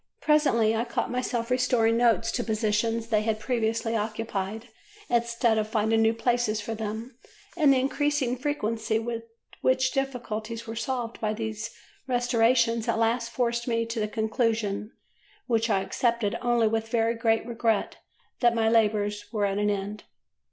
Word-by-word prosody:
Presently 270 -8 +3
I 225 - +1
caught 235 - -2
myself 250 -1 -2
restoring 245 -3 +3
notes 230 -1 +3
to 245 - -1
positions 225 +1 0
they 215 -2 +3
had 215 0 -1
previously 225 0 -1
occupied 215 -1 -3 0.4
instead 235 -1 +2
of 215 - -1
finding 220 0 +1
new 225 0 +3
places 235 -2 +1
for 215 +2 -4
them, 220 +3 -5 0.4
and 305 -5 +5
the 270 - +4
increasing 275 -1 0
frequency 230 -5 -1
with 230 0 -4 0.4
which 260 0 +2
difficulties 235 -5 -3
were 225 0 -6
solved 235 0 -3
by 215 -1 0
these 220 0 -4 0.4
restorations 235 -2 +2
at - - +1
last 230 +1 +1
forced 235 0 -1
me 230 -1 +1
to 230 0 -4
the 215 - 0
conclusion, 220 -1 -1 0.5
which 230 -1 +1
I 195 -3 +2
accepted 230 0 0
only 240 -2 +2
with 225 0 -1
very 230 0 +2
great 225 -1 +1
regret, 230 -2 0 0.4
that 240 -1 +3
my 225 -1 +2
labours 210 -2 +1
were 210 -3 0
at 200 0 -1
an 210 0 +2
end. 205 +1 -3
230 Hz, 155 wpm, -27 LUFS, 220-240 Hz, 0.5 s, and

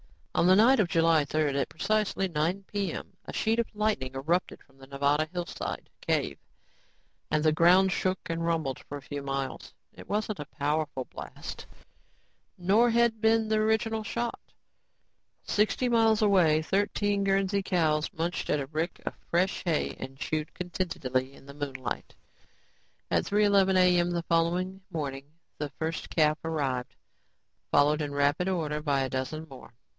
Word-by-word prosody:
On 175 - +3
the 185 - +7
night 240 +6 +6
of 200 - +3
July 165 -3 +3
3rd, 150 -1 0
at - - -3
precisely 210 +1 0
9:00 175 +4 -1
p.m., 200 -4 -4
a - - -7
sheet 225 +1 +1
of 235 - +1
light 210 -5 +1
erupted 135 +7 -2
from 135 -1 -27
the 135 - -13
Nevada 140 +3 +1
hillside 175 -1 -5
cave - - -1 0.9
and 155 0 +1
the 155 - +5
ground 180 +4 +5
shook 185 0 0
and 165 0 -2
rumbled 160 -6 -1
for 145 - -8
a - - -10
few 145 0 -5
miles. 135 -1 -4 0.2
It - - -13
wasn't 210 0 -1
a 150 - -4
powerful 145 -2 -2
blast, - - -9 0.9
nor 200 +7 +4
had 235 -1 +2
been 225 0 +3
the 220 - +2
original 220 0 +1
shot. 235 +2 -3 1.0
Sixty 215 +4 +1
miles 225 -2 +3
away, 170 -7 +4
thirteen 205 +2 0
Guernsey 195 0 +1
cows 160 -5 +1
munched 170 +2 -3
at 150 - +2
a 140 - -2
rick 160 +4 -3
of - - -2 0.2
fresh 180 +3 +1
hay 165 -3 0
and 130 0 -7
chewed 155 +1 -3
contentedly 140 -8 -2
in 135 - -17
the 140 - -10
moonlight. 135 -3 -5 1.0
At - - +2
3:11 200 -2 +3
a.m., 180 -1 +4
the 170 -1 -1
following 175 +3 0
morning 145 -4 -5 0.3
the 150 -1 -2
first 160 0 -3
calf 155 -1 +2
arrived, 140 -6 -2 0.7
followed 150 +2 +3
in 145 -1 -3
rapid 145 +6 +1
order 155 -5 -1
by 140 -3 +1
a 135 - -1
dozen 130 +5 -3
more. 130 -4 -13
165 Hz, 155 wpm, -28 LUFS, 145-195 Hz, 1.0 s, the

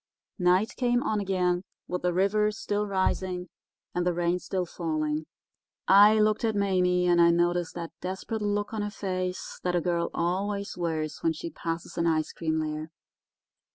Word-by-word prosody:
"Night 180 +4 +3
came 245 -1 +2
on 215 - 0
again 180 -2 0 0.2
with 180 0 -3
the 180 - +1
river 200 +4 +2
still 210 -1 -2
rising 185 -2 -1 0.4
and 180 - 0
the 175 -1 +1
rain 175 +1 +1
still 185 0 -2
falling. 155 -2 -2 0.6
I 205 +2 +8
looked 215 +1 +2
at 220 -2 +1
Mame 180 -3 +2
and 175 -1 +5
I 170 - +7
noticed 175 0 +1
that 170 -1 -5
desperate 190 +4 -4
look 205 +1 -1
on 220 - -2
her 210 - -2
face 185 -3 -4
that 180 -1 0
a - - +3
girl 170 0 0
always 200 +4 -1
wears 160 -3 -2
when 165 - +2
she 165 +2 -6
passes 165 +2 -5
an 170 - +2
ice 155 -1 +1
cream 160 -1 -1
lair. 155 0 -3
180 Hz, 170 wpm, -28 LUFS, 170-200 Hz, 0.6 s, I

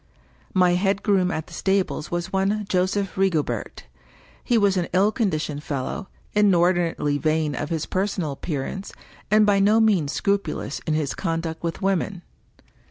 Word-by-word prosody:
My 180 -1 +5
head 195 +2 +1
groom 195 -4 +2
at 160 -3 -3
the - - -15
stables 190 -5 0
was 175 +2 -3
one 200 +2 +1
Joseph 185 +1 0
Rigobert. 185 -6 -1 0.6
He 240 - +2
was 200 -3 +3
an 175 -2 0
ill 195 +4 +4
conditioned 155 - -1
fellow, 145 +8 -4 0.3
inordinately 175 -7 +2
vain 155 -1 +1
of 145 +3 -4
his 160 -2 -2
personal 190 -5 -1
appearance, 150 +7 -4 0.4
and 215 0 +5
by 205 -1 +3
no 210 +3 +4
means 195 -10 +3
scrupulous 200 -7 -1
in 155 - +1
his 150 -3 -1
conduct 165 -2 -3
with 170 +2 -4
women. 190 -1 0
185 Hz, 150 wpm, -24 LUFS, 160-200 Hz, 0.6 s, My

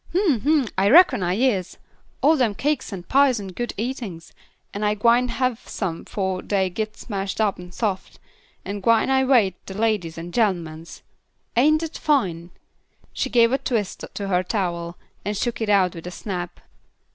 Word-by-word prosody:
"Hm! 350 - +3
Hm! 290 0 +2
I 195 +1 +3
reckon 295 - +6
I 180 0 0
is. 205 -6 0 0.5
All 310 +3 +6
dem 240 -8 +1
cakes 295 +1 -1
an' 190 -3 -6
pies 265 +1 +3
an' 195 -2 -6
good 240 +6 -4
eatin's, 225 -8 -5 0.4
an' 205 - -4
I 210 0 +2
gwine 235 +4 +3
have 250 -1 -1
some 175 -5 -4
fo' 190 -2 -2
dey 190 -2 0
gits 215 +3 -5
mashed 195 -3 -3
up 210 -4 +1
an' 180 0 -10
soft, 195 -1 -3 0.5
an' 200 - -4
I - - -6
gwine 245 +5 +3
wait 230 -9 +4
on - - -40
de 190 - -6
ladies 210 -7 0
and 170 +1 -7
gent'mans. 170 -7 -2 0.5
Ain't 305 +6 +4
dat 325 -1 -5
fine?" 180 - 0 0.6
She - - -2
gave 230 -1 +4
a 270 - +1
twist 215 -6 -2
to 200 - -5
her 180 -2 +2
towel 175 -3 -3 0.3
and 205 +1 -2
shook 235 +2 -2
it 220 - -1
out 190 -3 +3
with 165 +1 -9
a - - -3
snap. 180 -1 -6
210 Hz, 180 wpm, -23 LUFS, 185-245 Hz, 0.6 s, reckon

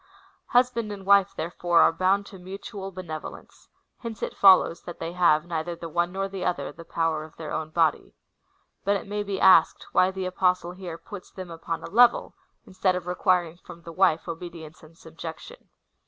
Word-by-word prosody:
Husband 245 -3 +2
and 195 -2 -8
svife, 200 -1 +4
therefore, 170 +1 +1
are - - +6
bound 190 +4 +1
to 195 - -12
mutual 195 +1 -8
benevolence: 170 -4 -9 0.3
hence 230 -3 -7
it - - -4
follows; 185 -3 +5
that 175 - -9
they 165 0 -5
have, 170 -3 +3
neither 170 0 -3
the 165 0 -8
one 175 +2 0
nor 195 +1 -2
the 195 -1 -6
other, 175 -7 -2
the 165 +3 -12
power 165 -2 -1
of 155 - -13
their 160 -2 -7
own 155 -1 -3
body. 160 -1 0 0.7
But 200 +1 +2
it - - -4
may 205 +1 -3
be 200 -2 -3
asked, 190 - +5
why 185 - +4
the 190 -1 -4
Apostle 180 -1 0
here 180 -2 -8
puts 185 +3 -10
them 185 -2 -9
upon 165 0 -5
a - - -6
level, 240 +3 +4 0.3
instead 185 0 0
of 180 -1 -4
requiring 180 -2 +1
from 170 -1 -13
the 165 - -9
wife 180 -3 +2
obedience 170 -1 -8
and 160 0 -17
subjection. 165 - -10
180 Hz, 185 wpm, -26 LUFS, 165-195 Hz, 0.7 s, are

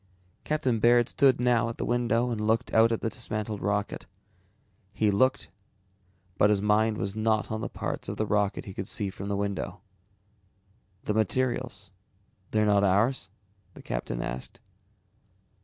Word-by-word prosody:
Captain 130 -7 0
Baird 120 +2 +5
stood 135 -3 +3
now 120 -1 +2
at 115 - -6
the - - -2
window 120 0 +1
and 110 -2 -2
looked 110 +1 0
out 115 +1 +5
at 115 - -1
the 115 - -1
dismantled 110 -3 -4
rocket. 105 +1 -2 0.9
He 105 -1 +2
looked 130 +7 +1 0.9
but 105 - +5
his 105 -1 +3
mind 105 +1 +2
was 100 0 -2
not 110 0 0
on 110 0 -3
the - - -3
parts - - -4
of - - -4
the 110 - 0
rocket 105 -1 0
he 95 - -8
could 95 0 -5
see 105 -5 -2
from 95 +1 -7
the 100 - 0
window. 100 -1 -3 1.2
"The 105 - -1
materials, 110 -2 -1 0.6
they're 110 0 +2
not 100 -1 +3
ours?" 100 +3 +2 0.5
the - - -12
captain - - -3
asked. 60 +1 -6
110 Hz, 155 wpm, -28 LUFS, 100-120 Hz, 1.2 s, Baird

